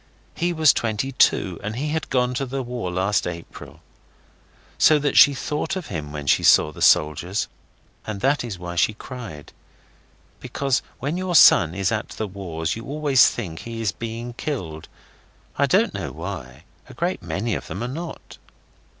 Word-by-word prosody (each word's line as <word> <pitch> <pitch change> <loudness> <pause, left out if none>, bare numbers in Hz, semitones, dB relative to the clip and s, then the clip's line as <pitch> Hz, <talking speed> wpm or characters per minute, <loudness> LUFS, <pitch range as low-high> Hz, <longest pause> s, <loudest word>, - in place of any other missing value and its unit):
He 175 +1 -1
was 160 -4 +5
twenty 115 +4 -2
two, 95 -8 +2
and 110 +3 -4
he 145 +5 -2
had 160 0 -3
gone 125 -1 +1
to 135 +2 -2
the 135 +1 -3
War 120 -6 -4
last 95 +1 0
April. 85 -1 -9 1.0
So 155 - +6
that 145 -1 -1
she 140 - +7
thought 150 +7 -3
of 185 -3 -6
him 75 -3 -5
when 75 -1 -6
she 70 - +3
saw 75 - +5
the - - -12
soldiers, 85 +6 +3 0.6
and 110 -2 -4
that 140 +3 +2
was 110 -6 -5
why 90 0 -7
she 105 +5 +2
cried. 110 - -9 0.9
Because 135 -2 -1 0.2
when 145 +6 -3
your 185 -1 -2
son 85 - +7
is 95 +1 0
at 110 -2 -2
the 110 - -4
wars 85 -4 -4
you 115 - -7
always 145 -3 +4
think 85 -9 -6
he 115 -1 -7
is 110 -3 0
being 115 +2 -6
killed. 90 - -5 0.7
I - - +2
don't - - +2
know - - -4
why. 80 -7 -7 0.3
A - - -12
great - - -2
many 110 +3 -2
of - - -4
them 100 - -5
are - - -2
not. 165 +6 -8
115 Hz, 175 wpm, -23 LUFS, 90-135 Hz, 1.0 s, she